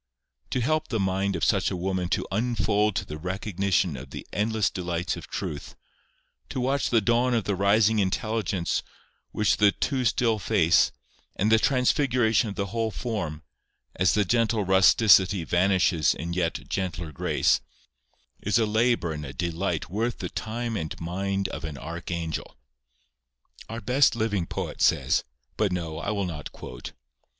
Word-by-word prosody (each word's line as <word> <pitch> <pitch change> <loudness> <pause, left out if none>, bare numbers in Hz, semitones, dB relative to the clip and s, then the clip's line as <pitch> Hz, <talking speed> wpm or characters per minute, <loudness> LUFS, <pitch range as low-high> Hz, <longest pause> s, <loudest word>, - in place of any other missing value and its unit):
To 130 - -1
help 155 +5 0
the 110 - -2
mind 95 0 0
of 85 - -3
such - - +2
a - - -3
woman 90 0 -2
to - - 0
unfold 105 -2 +1
to - - -1
the 75 +1 -7
recognition 95 -1 -1
of 65 +1 -9
the - - -8
endless 105 -2 +1
delights 90 -1 -2
of - - -9
truth; 70 -1 -5 0.7
to - - -3
watch 135 +2 0
the 115 -2 +3
dawn 120 +3 +2
of 115 - +1
the 100 - -1
rising 105 +3 +3
intelligence 100 -2 -1 0.5
upon 105 - -2
the 105 -1 +6
too 135 -3 -1
still 115 -1 +2
face, 85 -3 +3 0.4
and 105 +3 +1
the 110 - +6
transfiguration 125 -4 +2
of 100 - -6
the 100 - -1
whole 115 -1 0
form, 100 -10 -4 0.5
as 95 - +3
the 105 -1 +2
gentle 115 0 +1
rusticity 95 0 +5
vanishes 90 -2 +2
in 85 +1 -5
yet 85 -2 -2
gentler 90 -4 -3
grace, 70 - +1 0.8
is - - +1
a 115 - +3
labour 110 -5 +1
and 75 -1 -6
a 70 -1 -7
delight 85 +2 -2
worth 115 +5 -1
the - - -5
time 115 +1 -4
and 80 -6 -4
mind 95 +3 -2
of - - -6
an 80 -3 -5
archangel. 85 +2 -5 1.1
Our 115 +1 -5
best 125 0 +3
living 105 -6 -1
poet - - -5
says—but 65 - 0
no; 80 -3 -3
I 100 - -3
will 100 -2 -1
not 75 -5 -6
quote. - - -9
100 Hz, 160 wpm, -26 LUFS, 85-110 Hz, 1.1 s, the